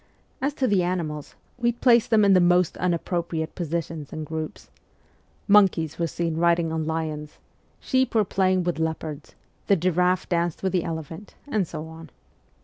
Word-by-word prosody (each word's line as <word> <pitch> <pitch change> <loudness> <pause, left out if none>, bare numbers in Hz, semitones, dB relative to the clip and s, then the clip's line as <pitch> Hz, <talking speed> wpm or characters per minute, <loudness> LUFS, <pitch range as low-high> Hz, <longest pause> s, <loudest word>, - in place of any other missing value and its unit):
As 280 +2 -1
to 265 - 0
the 205 -6 +3
animals, 165 -5 -3 0.2
we 240 0 +2
placed 235 -1 +4
them 220 -2 +5
in 200 - +5
the 185 - +6
most 175 0 +3
unappro 175 0 -1
priate 160 -1 -4
positions 165 -3 -4
and 155 -1 -5
groups: 160 0 -6 0.8
monkeys 190 -7 +4
were 170 - +1
seen 165 +2 -2
riding 170 -1 +2
on 160 -1 -2
lions, 155 -2 -4 0.4
sheep 260 -3 0
were 215 -2 +4
playing 185 -1 +1
with 175 -2 -2
leopards, 160 -2 -4 0.3
the 200 - +5
giraffe 180 +1 +1
danced 170 -1 -1
with 190 - +1
the 180 -3 +1
elephant, 165 +4 -7
and 210 - 0
so 155 - -6
on. 160 0 -11
170 Hz, 165 wpm, -25 LUFS, 160-190 Hz, 0.8 s, the